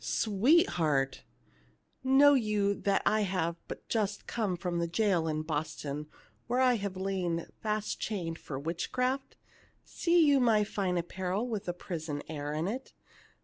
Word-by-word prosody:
" - - -17
Sweetheart 190 - +2 0.3
!" 60 0 -33
" - - -44
Know 275 +2 +6
you 210 -5 +2
that 200 -1 0
I 215 - +3
have 180 -4 -1
but - - -8
just 210 -3 -1
come 205 -6 -1
from 175 -1 -2
the 170 - 0
jail 175 -2 +1
in 155 0 -1
Boston, 150 -1 -3 0.4
where 245 +1 +1
I 255 -1 +5
have 200 -2 -4
lain 185 -3 -1 0.2
fast 215 -1 -2
chained 170 -6 -3
for 135 - -6
witchcraft? 250 - -2 0.5
See 340 -1 +3
you 285 -2 +5
my 225 -4 +4
fine 195 -3 -1
apparel 185 +5 -2
with 220 -5 -3
the 175 - -2
prison 160 -5 -5
air 145 -2 -4
in 155 +3 -1
it 255 +6 -5
190 Hz, 160 wpm, -31 LUFS, 165-220 Hz, 0.5 s, Know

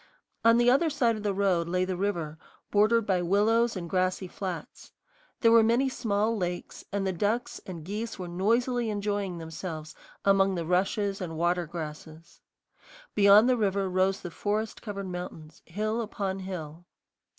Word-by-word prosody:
On 230 0 +6
the 240 0 +3
other 280 +7 +4
side 245 -6 +2
of 215 - -6
the 205 -1 0
road 190 -4 +1
lay 180 +1 +1
the 185 0 -2
river, 170 -5 -2 0.3
bordered 215 +2 +4
by 185 -3 +1
willows 220 +6 +2
and 175 -2 -5
grassy 185 +1 0
flats. 180 -3 -7 0.5
There 230 - +5
were 230 0 +8
many 235 +4 +3
small 220 -3 0
lakes, 180 -3 -4
and 200 -1 -1
the 190 - 0
ducks 210 +7 -1
and 170 -4 -7
geese 215 +4 -4
were 180 -2 -5
noisily 230 +7 +1
enjoying 205 -3 -2
themselves 160 -1 -6 0.3
among 195 -1 +4
the 170 -2 -3
rushes 195 +3 0
and 165 -3 -5
water 175 0 +1
grasses. 155 0 -8 0.7
Beyond 205 +3 +7
the 255 -1 +3
river 200 -2 +1
rose 185 +1 +1
the 175 - -6
forest 215 +4 -2
covered 200 -3 -5
mountains, 165 -3 -8
hill 215 +6 -2
upon 195 -3 -3
hill. 175 -3 -7
195 Hz, 160 wpm, -28 LUFS, 175-215 Hz, 0.7 s, were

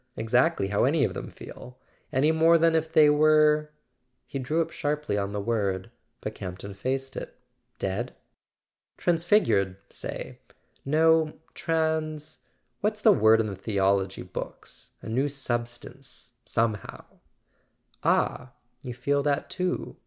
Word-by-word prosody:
—exactly 120 0 +2
how 100 - +2
any 145 +3 +3
of - - 0
them - - -6
feel? 125 +1 -11 0.3
Any 145 +4 +3
more 165 +1 +5
than 165 0 +4
if 160 0 0
they 155 -2 +7
were 150 0 +4 0.3
" 125 0 -49
He 135 - -5
drew 150 +6 -1
up 165 0 0
sharply 150 -6 -2
on 100 -1 -1
the 105 - -3
word, 100 -3 -1 0.3
but - - -4
Campton 95 +2 -7
faced 135 +6 -3
it. - - -7 0.4
"Dead?" 100 +6 -3 0.8
"Transfigured, 165 - +2
say; - - -6 0.4
no, 160 +2 +3 0.2
trans 160 -2 -1 0.4
what's 215 +1 -1
the 215 - +7
word 110 - +5
in 110 - +2
the 100 -2 -4
theology 95 -1 0
books? - - -8
A - - -7
new 130 +6 +1
substance... 125 -1 -4
somehow.. 115 -3 -2 1.0
"Ah, 120 - +1 0.3
you 125 -2 -6
feel 140 +3 +1
that 140 0 -1
too?" 180 0 -2
135 Hz, 135 wpm, -27 LUFS, 110-155 Hz, 1.0 s, they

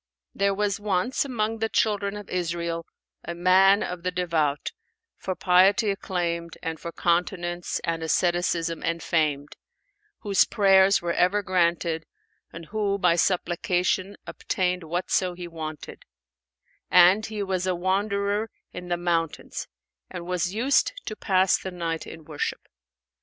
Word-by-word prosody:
There 200 0 +1
was 205 -1 0
once, 205 +6 0
among 225 -4 -2
the 225 0 0
children 205 -2 0
of 205 - -9
Israel, 170 -1 -3 0.4
a 170 - -5
man 190 +3 +5
of 180 -1 -5
the 180 - -1
devout, 165 -5 -1 0.4
for 185 - -4
piety 195 +4 +4
acclaimed 170 -4 -3
and 160 -1 -4
for 170 - -6
continence 175 0 -1
and 165 -1 -2
asceticism 170 0 0
enfamed, 155 -3 -1 0.6
whose 200 -3 +4
prayers 195 -2 +4
were 170 -1 0
ever 200 +4 +2
granted 170 -3 0 0.4
and 165 0 -9
who 200 +1 -1
by 180 -3 +3
supplication 180 +2 0
obtained 180 -1 -2
whatso 175 +2 -1
he 175 0 -7
wanted; 155 -2 -7 0.9
and 180 +4 +6
he 215 -2 -4
was 185 -1 -2
a 185 - +1
wanderer 200 +3 0 0.2
in 180 0 -7
the 175 0 -1
mountains 170 -2 -2 0.4
and 175 -2 -7
was 180 0 -1
used 240 +7 +2
to 215 - -5
pass 190 -3 +2
the 190 - -5
night 170 -3 -4
in 160 -1 -10
worship. 150 -2 -4
180 Hz, 135 wpm, -25 LUFS, 170-195 Hz, 0.9 s, and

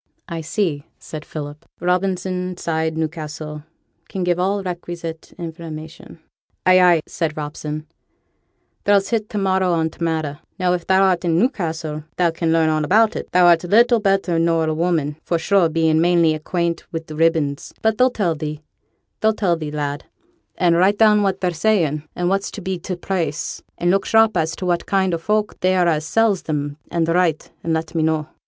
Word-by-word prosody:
'I 170 -2 -4
see,' 160 -3 -2
said 155 -1 -8
Philip: 150 -1 -7 0.2
'"Robinson, 180 0 -1
Side, 160 -1 -1
Newcastle, 155 -1 -4 0.5
can 190 - -3
give 175 0 +1
all 195 +2 0
requisite 170 -2 -6
information."' 160 -2 -8 0.5
'Ay, 185 0 +6
ay,' 175 -3 +5
said 160 -3 -3
Robson; 150 0 -5 1.0
'thou's 200 -1 +3
hit 220 -3 -1
t' 210 - -4
marrow 190 -2 +2
on 160 -1 0
t' 170 - -7
matter. 155 -3 -2 0.2
Now, 180 -2 +1
if 175 -1 -3
thou'rt 190 -2 +3
i' - - -1
Newcassel, 165 - -1
thou 175 -2 +3
can 165 0 -1
learn 165 -1 +3
all 155 -1 +1
about 215 +8 +3
it; - - -5
thou'rt 175 -1 +5
little 235 +5 +5
better 195 -4 +1
nor 165 -1 +2
a 155 - 0
woman, 155 -3 0
for 170 - 0
sure, 175 +1 +3
bein' 160 0 +2
mainly 170 -2 +4
acquaint 170 +2 -2
wi' 165 -1 -4
ribbons, 155 -3 0
but 220 -1 +1
they'll 255 +1 +5
tell 200 -9 0
thee 150 -1 -5 0.6
they'll 220 0 +3
tell 180 -6 +1
thee, 155 -2 -5
lad; 145 -1 -3 0.5
and 170 -2 +3
write 195 +4 +3
down 210 -1 +5
what 195 -1 0
they 180 -1 +1
sayn, 165 -5 +1
and 175 - -1
what's 195 +2 0
to 210 - -8
be 185 -1 -3
t' 180 +1 -4
price, 170 -4 -3 0.2
and 175 +1 +1
look 195 0 +1
sharp 220 0 +4
as 160 +1 0
to 185 - -5
what 175 -1 0
kind 190 -2 +1
o' 165 - -1
folk 210 +4 -1
they 185 +1 +2
are 180 -1 +3
as 155 -2 +1
sells 220 0 +2
'em, 145 -1 -2
an' 170 -1 0
write 165 -1 +1
and 165 - 0
let 160 +2 -3
me 165 - 0
know. 155 -1 +1
170 Hz, 185 wpm, -20 LUFS, 160-190 Hz, 1.0 s, Ay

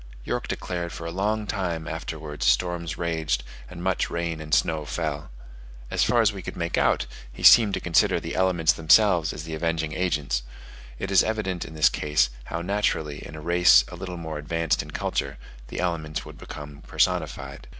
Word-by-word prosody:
York - - -3
declared 85 -1 -4
for 85 - -7
a 85 - -4
long 105 +4 -1
time 90 -6 -3
afterwards 80 -2 -5
storms 85 -2 +1
raged, 80 -6 -1 0.3
and 85 -1 -8
much 95 -1 0
rain 85 -2 -3
and 75 0 -9
snow 80 +1 +2
fell. 75 -1 -3 0.6
As - - +2
far 120 -1 +3
as 105 -2 +3
we 95 - -7
could - - -7
make 85 -1 -1
out, - - +2 0.3
he - - -11
seemed 105 -4 +8
to - - -2
consider 85 -2 +3
the - - -6
elements 85 -4 +3
themselves 85 0 +4
as 75 - -7
the 80 0 -7
avenging 80 -1 -1
agents: 75 -9 0 0.6
it - - -4
is 95 - +6
evident 105 -5 -2
in 80 - -10
this 75 -1 +5
case, 75 -5 +1
how 85 0 -4
naturally, 90 -6 -1
in 80 - -9
a 80 - -8
race 90 +3 +6
a - - -8
little 90 -2 -6
more 80 -2 -5
advanced 80 +1 0
in - - -10
culture, 70 0 -2 0.3
the - - -6
elements 80 -4 -2
would - - -11
become 75 -1 -9
personified. - - -1
85 Hz, 185 wpm, -25 LUFS, 75-90 Hz, 0.6 s, seemed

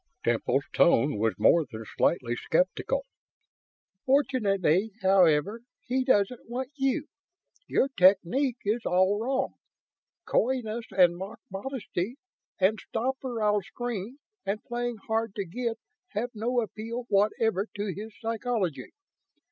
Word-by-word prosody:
Temple's - - +1
tone 135 -1 +4
was 110 0 +1
more 170 - +5
than 110 -1 -7
slightly 120 -8 +1
skeptical. - - 0 1.0
"Fortunately, 210 - +2
however, 190 +2 +4 0.2
he 260 +1 0
doesn't 235 -2 +1
want 255 +2 -4
you. 275 +2 0 0.6
Your - - +2
technique 225 +5 +3
is 220 +4 +1
all 185 +3 +3
wrong. 265 +3 -1 0.7
Coyness 235 -2 0
and 180 -3 +4
mock 195 +5 -7
modesty 215 -1 -4 0.4
and 195 +3 +3
stop 255 +4 -2
or 240 -4 -3
I'll 210 -1 +3
scream 240 +3 -5 0.3
and 205 +2 -3
playing 240 -1 -3
hard 225 -2 -1
to 200 - -2
get 230 +6 -3 0.4
have 235 +4 -2
no 240 +3 0
appeal 230 +3 -5
whatever 210 0 +2
to 205 -2 -2
his 215 +2 -8
psychology. 225 - -2
220 Hz, 120 wpm, -28 LUFS, 195-245 Hz, 1.0 s, more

